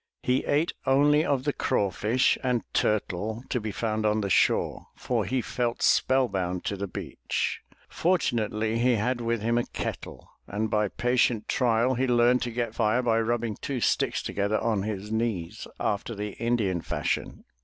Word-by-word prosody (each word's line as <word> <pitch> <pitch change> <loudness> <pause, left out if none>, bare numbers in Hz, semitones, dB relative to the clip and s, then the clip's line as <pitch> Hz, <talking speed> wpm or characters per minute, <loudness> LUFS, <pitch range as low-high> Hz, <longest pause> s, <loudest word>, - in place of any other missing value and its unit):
He 125 +1 +1
ate 155 +4 +1
only 145 +3 +4
of 140 -5 0
the 145 0 0
craw 100 -7 0
fish 115 +7 +2
and 125 -3 +1
turtle 110 +2 0
to 125 - -1
be 110 0 -3
found 110 +1 -2
on 105 0 +2
the 100 -1 -2
shore, - - +2
for - - -1
he 130 -1 0
felt 120 -1 -2
spell 130 0 +4
bound 90 -3 -3
to 100 - -1
the 100 +1 -4
beach. - - -3 0.3
For 180 +3 +2
tunately 110 -4 -1
he 125 0 +3
had 120 +3 -1
with 115 -2 -1
him 120 +1 +2
a - - 0
kettle, - - -6 0.2
and 105 +2 -2
by 105 -1 +2
patient 120 0 +1
trial 125 -1 +2
he 130 +1 0
learned 120 +1 +4
to 120 - -2
get 115 -1 -2
fire 115 +2 +1
by 115 -2 +2
rubbing 115 -1 -1
two 135 -3 -2
sticks 110 - +1
together 100 +2 0
on 110 -3 0
his 105 0 -4
knees, 110 -7 -2
after 105 +3 -2
the 105 +1 -4
Indian 105 -7 +1
fashion. - - -3
115 Hz, 175 wpm, -27 LUFS, 105-125 Hz, 0.3 s, only